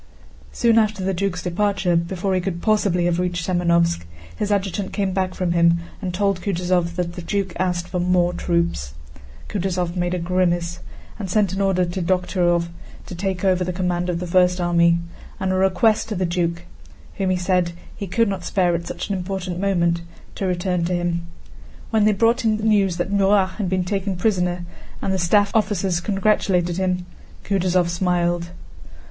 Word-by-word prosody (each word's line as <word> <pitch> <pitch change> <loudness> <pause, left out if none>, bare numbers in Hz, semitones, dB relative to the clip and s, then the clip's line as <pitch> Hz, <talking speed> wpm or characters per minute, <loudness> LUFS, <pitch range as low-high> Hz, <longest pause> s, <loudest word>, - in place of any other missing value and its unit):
Soon 230 -1 +3
after 215 -3 0
the 190 +1 0
duke's 180 -1 -2
departure—before 185 -1 0
he 185 - +1
could 180 -2 -3
possibly 200 -4 +2
have 175 0 +1
reached 180 -2 -1
Semënovsk—his 170 - 0
adjutant 200 -1 -1
came 195 -3 -1
back 185 -1 -1
from 180 -2 -1
him 170 0 +4 0.2
and 185 -3 -2
told 195 0 0
Kutúzov 175 -2 0
that 175 -1 -2
the 175 - -7
duke 195 +1 -2
asked 180 -1 -1
for 180 - -3
more 180 0 +2
troops. 170 - -1 0.5
Kutúzov 180 -2 -2
made 175 0 0
a - - -1
grimace 175 -1 0 0.4
and 195 -3 -4
sent 200 -1 +2
an 195 - -1
order 190 -2 +2
to 175 +2 -4
Dokhtúrov 175 -1 +1 0.4
to - - -8
take 190 +1 -2
over 185 -1 +3
the 180 - -2
command 180 -1 -1
of 170 -1 -1
the 180 - -4
first 180 +1 +3
army, 170 -1 +3 0.4
and 190 0 0
a - - +1
request 200 +4 +2
to 215 - -2
the 185 0 0
duke—whom 175 +2 -4
he 185 - +2
said 180 -1 +1 0.2
he 200 - -5
could 230 +5 +2
not 195 -3 -3
spare 180 -2 +1
at 170 0 -3
such 175 - -5
an 200 - -1
important 185 -1 -4
moment—to 170 -1 -1
return 180 -1 0
to 180 - -1
him. 170 -1 -2 0.6
When 220 -2 +3
they 215 - +4
brought 230 +5 +2
him 220 -1 +2
news 205 -5 +2
that 175 +3 -2
Murat 195 -1 +3
had 195 -4 -1
been 185 0 +1
taken 195 0 -2
prisoner, 180 -2 0 0.3
and 190 - -1
the 190 - 0
staff 200 +4 +3
officers 195 -5 +1
congratulated 190 -3 +1
him, 180 -1 0 0.4
Kutúzov 185 -3 +1
smiled. 175 -1 0
180 Hz, 175 wpm, -22 LUFS, 175-195 Hz, 0.6 s, him